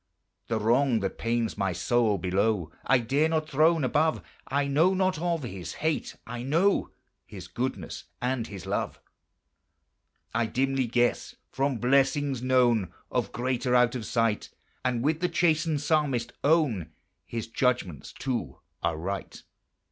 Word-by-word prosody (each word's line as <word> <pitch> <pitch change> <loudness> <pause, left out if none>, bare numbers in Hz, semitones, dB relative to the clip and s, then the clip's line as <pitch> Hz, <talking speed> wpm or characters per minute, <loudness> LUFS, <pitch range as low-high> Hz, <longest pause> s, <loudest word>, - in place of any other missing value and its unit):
The 115 -1 0
wrong 120 +2 +3
that 95 - -3
pains 115 -2 -1
my 95 -2 +1
soul 110 +3 +2
below 95 -1 0 0.2
I 135 - +6
dare 135 +7 +1
not 160 -1 0
throne 160 +1 +3
above, 155 +5 +1 0.2
I 140 +1 +1
know 160 +7 +3
not 185 -3 +1
of 170 -3 0
His 95 -7 -6
hate, 160 0 -2
I 120 +1 -6
know 165 +10 +2 0.3
His 95 -3 -10
goodness 110 -5 -4
and 125 -2 -1
His 100 -3 -8
love. - - -2 1.3
I 115 0 +1
dimly 130 +2 0
guess 120 +1 0 0.2
from 135 -1 0
blessings 135 +2 +2
known 120 -7 +3 0.2
Of - - -1
greater 125 +1 0
out 125 -1 +4
of 120 -5 -4
sight, 115 -3 0 0.3
And, 125 -2 0
with 155 +2 +1
the 180 +1 0
chastened 165 -3 +2
Psalmist, 145 -6 +1
own 140 - +2 0.4
His 115 -2 -4
judgments 115 - -1
too 120 - -3 0.2
are - - 0
right. 95 +4 -5
125 Hz, 140 wpm, -27 LUFS, 115-145 Hz, 1.3 s, I